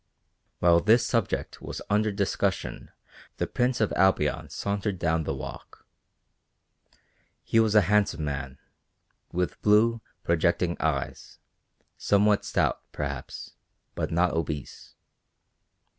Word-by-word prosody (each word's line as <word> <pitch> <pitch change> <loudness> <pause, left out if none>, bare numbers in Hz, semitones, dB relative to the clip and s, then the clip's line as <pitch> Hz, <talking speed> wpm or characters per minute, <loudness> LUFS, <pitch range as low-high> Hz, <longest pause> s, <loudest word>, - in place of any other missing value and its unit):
While 85 -1 +5
this 110 +6 +4
subject 115 -5 -1
was - - -6
under 105 +1 +2
discussion 100 -1 -2 0.5
the - - 0
Prince 125 0 0
of 110 - +1
Albion 95 0 +2
sauntered 100 -1 -2
down 80 -2 0
the 70 - -2
walk. 65 - -9 1.6
He 115 - +2
was 110 -1 +3
a 105 - +8
handsome 95 -5 +1
man, 70 -2 -4 0.7
with 90 -3 -2
blue 110 +2 +4 0.2
projecting 85 +1 +1
eyes, 70 -4 -3 0.6
somewhat 105 0 +2
stout, - - 0
perhaps, 70 -3 -6 0.4
but - - -2
not 85 +1 +2
obese. 75 -4 -5
95 Hz, 110 wpm, -27 LUFS, 80-105 Hz, 1.6 s, a